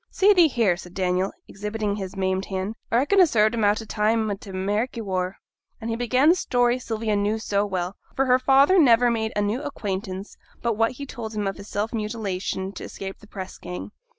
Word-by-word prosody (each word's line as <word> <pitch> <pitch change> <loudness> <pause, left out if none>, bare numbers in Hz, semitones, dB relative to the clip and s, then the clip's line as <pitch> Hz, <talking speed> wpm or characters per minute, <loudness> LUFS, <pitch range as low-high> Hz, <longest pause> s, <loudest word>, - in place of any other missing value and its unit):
'See 405 +2 +5
thee 350 -4 +6
here!' 230 - +2
said 180 0 -12
Daniel, 185 0 0 0.2
exhibiting 210 0 -3
his 190 -2 -6
maimed 190 0 0
hand; 190 +2 -3 0.2
'a 230 - +4
reckon 290 +10 +4
a 360 - +7
served 215 -4 +3
'em 230 -2 0
out 205 +1 +3
time 215 0 +1
o' - - +1
t' 200 +1 -10
Ameriky 205 +6 -1
war.' 185 -3 -2 0.4
And 225 +1 -4
he - - 0
began 250 +4 +2
the - - +8
story 245 -7 +1
Sylvia 225 -3 -2
knew 205 +2 +1
so 205 -2 0
well; 185 -1 -3 0.2
for 270 - +2
her 255 0 +4
father 275 +8 +5
never 245 -4 +5
made 220 -1 -1
a 205 - +1
new 215 +6 -1
acquaintance 195 -8 -5 0.3
but 235 -1 +2
what 225 +3 +2
he 280 +3 -7
told 225 -5 -7
him 210 -1 -1
of 195 - -2
his 200 - -10
self 210 +3 -2
mutilation 205 -4 -3
to - - -8
escape 195 0 -7
the 210 - -16
press 190 -2 -8
gang. 180 +3 -7
215 Hz, 215 wpm, -24 LUFS, 195-240 Hz, 0.4 s, the